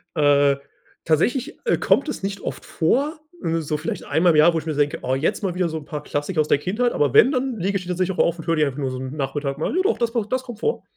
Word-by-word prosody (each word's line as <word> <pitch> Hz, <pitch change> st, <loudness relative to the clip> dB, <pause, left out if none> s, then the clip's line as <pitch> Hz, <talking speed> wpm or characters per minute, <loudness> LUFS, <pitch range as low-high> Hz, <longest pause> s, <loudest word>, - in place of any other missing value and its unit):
Äh, 145 Hz, -2 st, +4 dB, 0.5 s
tatsächlich, 245 Hz, -, +1 dB
äh, 465 Hz, -, +2 dB
kommt 310 Hz, -, +2 dB
es 240 Hz, -, -5 dB
nicht 195 Hz, 0 st, -3 dB
oft -, -, -6 dB
vor, 280 Hz, -, 0 dB, 0.2 s
so 160 Hz, -2 st, -1 dB
vielleicht 155 Hz, -, -4 dB
einmal 170 Hz, +1 st, +3 dB
im -, -, +1 dB
Jahr, 165 Hz, +3 st, +6 dB
wo 165 Hz, -, +1 dB
ich 155 Hz, -, -10 dB
mir 155 Hz, -, -2 dB
denke: 145 Hz, 0 st, 0 dB
„Oh, 130 Hz, +1 st, 0 dB
jetzt 160 Hz, +9 st, -1 dB
mal 190 Hz, -4 st, -2 dB
wieder 180 Hz, -1 st, +1 dB
so 160 Hz, -, -4 dB
'n 155 Hz, -, -8 dB
paar 150 Hz, -1 st, -6 dB
Klassiker 155 Hz, +4 st, -1 dB
aus 150 Hz, -, -1 dB
der 140 Hz, -, +3 dB
Kindheit“, 215 Hz, +9 st, 0 dB
aber 145 Hz, -4 st, +1 dB
wenn, 255 Hz, -, +7 dB
dann 255 Hz, -3 st, -1 dB
lege 195 Hz, +1 st, 0 dB
ich 185 Hz, -, -7 dB
die 180 Hz, -, -12 dB
tatsächlich 185 Hz, +1 st, -1 dB
auch -, -, +5 dB
auf 170 Hz, 0 st, 0 dB
und 165 Hz, -, -9 dB
höre 165 Hz, -, +1 dB
die 155 Hz, -1 st, +3 dB
einfach 140 Hz, -1 st, -4 dB
nur 135 Hz, -3 st, -2 dB
so 130 Hz, -, -5 dB
'n 130 Hz, +3 st, -6 dB
Nachmittag 140 Hz, 0 st, -3 dB
mal, 155 Hz, -, -2 dB
ja, 370 Hz, -, +3 dB
doch, 410 Hz, -, +1 dB
das 235 Hz, -1 st, -1 dB
macht 225 Hz, -3 st, -2 dB
das 255 Hz, 0 st, 0 dB
kommt 240 Hz, -4 st, -9 dB
vor. 455 Hz, -, -1 dB
165 Hz, 290 wpm, -22 LUFS, 145-215 Hz, 0.5 s, wenn